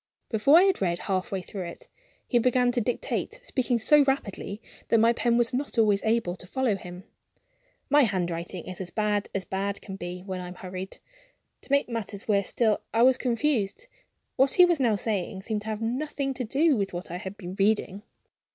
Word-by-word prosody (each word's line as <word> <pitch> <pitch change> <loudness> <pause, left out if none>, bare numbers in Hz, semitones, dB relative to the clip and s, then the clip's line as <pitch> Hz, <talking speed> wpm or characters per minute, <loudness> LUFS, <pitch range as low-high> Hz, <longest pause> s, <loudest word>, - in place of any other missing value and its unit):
Before 240 +8 +5
I 355 - +7
had 385 - +2
read 175 -3 +1
half 190 +4 -2
way 190 -2 -2
through 195 +2 -7
it, 170 - -9 0.4
he 240 - +3
began 250 +1 +3
to 245 - 0
dictate, 245 - -2
speaking 255 - 0
so 295 +7 +5
rapidly 210 -6 -2 0.3
that 230 - +4
my 230 +1 +5
pen 235 0 +1
was 240 +1 +2
not 270 0 -3
always 210 -3 +4
able 220 -5 +1
to 180 - -9
follow 255 0 0
him. 180 -1 -9 0.8
My 290 +1 +5
handwriting 175 -3 -3
is 185 0 -6
as 180 - -4
bad 210 0 -1
as 190 -2 -2
bad 200 +1 -2
can 195 -2 -8
be 180 0 -6
when 190 -1 -5
I 180 - -6
am 180 - -9
hurried. 185 +1 -7 0.6
To - - -10
make 280 0 +3
matters 220 -4 -5
worse 200 -3 +2
still, 220 -3 +1
I 230 +1 +3
was 260 +1 +6
confused. 250 - -1 0.5
What 265 +1 +4
he 360 - +8
was 345 -3 +1
now 235 -5 +3
saying 195 -2 -2
seemed 215 0 -2
to 210 - -10
have 220 0 -3
nothing 275 +3 -2
to 255 - -4
do 285 +6 +2
with 200 -4 -2
what 175 0 -6
I 175 - -3
had 190 +2 -7
been 180 -2 -7
reading. 205 -1 +1
215 Hz, 205 wpm, -27 LUFS, 190-250 Hz, 0.8 s, he